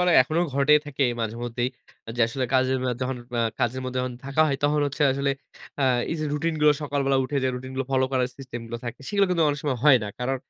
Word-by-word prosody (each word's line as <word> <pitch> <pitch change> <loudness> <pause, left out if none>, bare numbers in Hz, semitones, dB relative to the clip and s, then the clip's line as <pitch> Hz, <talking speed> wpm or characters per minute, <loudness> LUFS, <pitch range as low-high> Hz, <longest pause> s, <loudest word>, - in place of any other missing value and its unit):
মানে 180 -1 +3
এখনো 155 +5 -1
ঘটেই 140 +2 +5
থাকে 145 -1 -2 0.2
মাঝেমধ্যেই। 120 +2 -2 0.4
আ - - -3
যে 120 - -2
আসলে 130 +2 -2
কাজের 130 0 +3
অ্যা 125 - +1
যখন 130 0 -2 0.2
আ - - +3 0.2
কাজের 125 +2 0
মধ্যে 130 0 -3
যখন 130 - -4
থাকা 140 +3 0
হয়, 140 - 0
তখন 150 +1 +2
হচ্ছে 140 +2 -2
আসলে 140 +1 0 0.5
আ - - +4 0.3
এই - - -1
যে - - -1
রুটিন 160 +2 -1
গুলো 150 0 +6
সকালবেলা 140 -2 +1
উঠে 140 +2 -3
যে 130 - +2
রুটিন 130 +1 -7
গুলো 135 0 -1
ফলো 130 -1 +3
করার 125 -1 +1
সিস্টেম 130 -3 -7
গুলো 115 +1 -5
থাকে। 120 - -6
সেগুলো 200 -1 +3
কিন্তু 170 -2 +2
অনেক 145 0 -1
সময় 135 -4 -1
হয় 135 -4 +7
না। 105 - -4
কারণ 130 +2 -1
135 Hz, 240 wpm, -25 LUFS, 125-145 Hz, 0.5 s, হয়